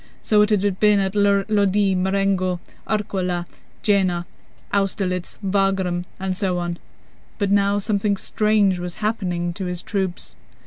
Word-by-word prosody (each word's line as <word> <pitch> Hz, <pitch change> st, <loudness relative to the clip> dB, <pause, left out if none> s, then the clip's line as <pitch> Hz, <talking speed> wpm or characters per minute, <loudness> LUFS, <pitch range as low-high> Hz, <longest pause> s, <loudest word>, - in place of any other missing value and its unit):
So 210 Hz, -1 st, +4 dB
it 210 Hz, -, +3 dB
had 200 Hz, -2 st, +1 dB
been 210 Hz, -1 st, +5 dB
at 195 Hz, -1 st, 0 dB
Lodi, 200 Hz, -1 st, +2 dB
Marengo, 190 Hz, -1 st, +1 dB, 0.3 s
Arcola, 185 Hz, -5 st, -1 dB, 0.4 s
Jena, 185 Hz, -4 st, +2 dB, 0.5 s
Austerlitz, 190 Hz, -3 st, -1 dB
Wagram, 190 Hz, -2 st, +1 dB
and 190 Hz, 0 st, -2 dB
so 185 Hz, -2 st, 0 dB
on. 175 Hz, 0 st, -3 dB, 0.6 s
But 200 Hz, -2 st, 0 dB
now 200 Hz, 0 st, +3 dB
something 205 Hz, 0 st, 0 dB
strange 210 Hz, -2 st, +2 dB
was 175 Hz, -1 st, -4 dB
happening 180 Hz, -5 st, -2 dB
to 190 Hz, +2 st, -5 dB
his 180 Hz, -1 st, -4 dB
troops. 190 Hz, -4 st, -3 dB
195 Hz, 130 wpm, -22 LUFS, 180-205 Hz, 0.6 s, been